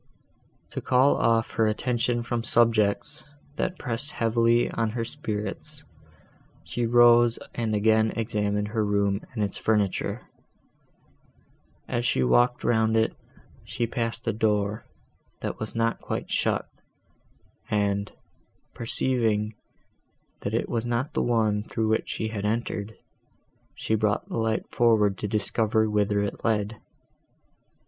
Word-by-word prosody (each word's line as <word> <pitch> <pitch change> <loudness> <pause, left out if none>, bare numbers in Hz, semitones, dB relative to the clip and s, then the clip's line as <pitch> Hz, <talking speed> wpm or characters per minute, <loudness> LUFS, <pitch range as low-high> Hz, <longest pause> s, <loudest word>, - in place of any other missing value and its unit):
To - - -4
call 130 +2 +4
off 115 0 +2
her 110 - +2
attention 120 +1 0
from 120 0 -2
subjects, 115 +5 +3 0.3
that 185 0 -1
pressed 125 +4 -1
heavily 115 +1 +2
on 115 -1 0
her 115 - -1
spirits, 120 +4 -4 0.8
she 120 -1 -2
rose 120 0 +6 0.2
and 110 -2 -1
again 110 +1 +3
examined 105 -2 -1
her 110 0 0
room 100 -1 +1
and 110 - 0
its 100 - -3
furniture. 105 -4 0 1.6
As 120 - -1
she 65 - +2
walked 120 - +3
round 110 -1 +2
it, 110 - +2 0.5
she 120 - -2
passed 115 0 -2
a - - +2
door, 105 0 0 0.6
that - - -4
was 110 +1 -5
not 115 0 0
quite - - -4
shut, - - 0 1.0
and, 100 -1 0 0.6
perceiving, 115 -3 0 0.9
that - - -3
it - - 0
was 115 -2 -1
not 120 +4 -2
the - - 0
one, 110 -3 +1
through 110 0 -2
which 110 - 0
she 110 0 -3
entered, 105 0 -2 0.8
she - - -2
brought 105 -1 +1
the - - -4
light 110 -1 -1
forward 110 -4 +3
to 105 - -2
discover 110 +1 +1
whither 105 -1 +1
it 100 - -5
led. 110 -1 -1
110 Hz, 125 wpm, -26 LUFS, 105-120 Hz, 1.6 s, rose